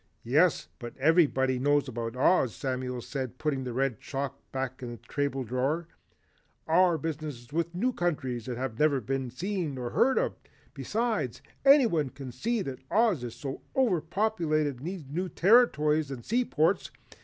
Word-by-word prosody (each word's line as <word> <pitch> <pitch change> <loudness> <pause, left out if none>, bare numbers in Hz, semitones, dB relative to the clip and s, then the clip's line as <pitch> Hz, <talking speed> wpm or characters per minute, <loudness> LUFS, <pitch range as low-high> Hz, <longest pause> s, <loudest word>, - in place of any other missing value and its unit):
"Yes, 150 +8 +3
but 120 -1 -8
everybody 135 -4 +3
knows 145 +1 +2
about 115 -1 -4
Oz," 130 -2 +3
Samuel 125 -2 -3
said 130 -3 -5
putting 140 -3 -1
the 125 - -3
red 130 -2 -1
chalk 140 0 -4 0.2
back 130 -1 -4
in 120 -1 -5
the - - -8 0.2
table 140 -2 0
drawer. 135 +8 -1 0.8
"Our 175 +1 +4
business 150 -4 -5
is 120 - -18
with 170 0 +1
wild 170 - -17
new 250 +8 +1
countries 135 - -2
that 125 -2 -3
have 125 -3 -4
never 150 -3 +3
been 130 +2 -2
seen 170 - -3
or 125 -1 -4
heard 265 +1 +3
of. - - +1 0.4
Besides, 220 - -2 0.2
anyone 240 - +5
can 135 -1 -8
see 220 - -1
that 135 -4 -6
Oz 215 - +2
is 120 +4 -8 0.3
overpopulated 170 - +1
and 130 - -10
needs 180 -3 -5
new 175 +6 -3
territories 155 - +4
and 130 -4 -7
sea 245 +3 +1
ports. 165 +2 +1
145 Hz, 165 wpm, -29 LUFS, 130-175 Hz, 0.8 s, anyone